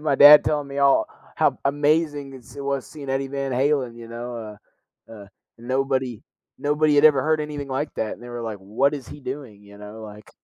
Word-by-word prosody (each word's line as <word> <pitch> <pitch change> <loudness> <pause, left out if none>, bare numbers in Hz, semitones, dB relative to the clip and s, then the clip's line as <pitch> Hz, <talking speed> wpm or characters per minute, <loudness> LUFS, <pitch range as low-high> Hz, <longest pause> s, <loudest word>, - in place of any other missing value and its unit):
my 150 -2 +1
dad 145 +2 +9
telling 150 -2 -1
me 140 0 -6
all 140 -1 +4 0.3
how - - +2
amazing 145 0 0
is 125 -1 -14
it 140 - -6
was 140 -2 -2
seeing 145 -3 -8
Eddie 135 +1 -1
Van 140 -1 -3
Halen, 130 -2 0
you 115 -1 -11
know, 115 -2 -7 0.5
uh, - - -13
uh, 105 -3 -11 0.3
nobody 130 -1 -2 0.4
nobody 150 +1 +2
had 145 +1 +4
ever 145 -4 +6
heard 155 +2 +1
anything 150 -2 -5
like 135 +3 -3
that, 110 - -2
and - - -17
they 120 - -10
were 120 0 -6
like, 110 -3 -5
"What 110 +9 0
is 140 -4 -8
he 145 - -10
doing?" 130 -6 -7
you 100 0 -15
know, 105 +2 -10
like 105 -1 -12
135 Hz, 215 wpm, -23 LUFS, 120-145 Hz, 0.5 s, dad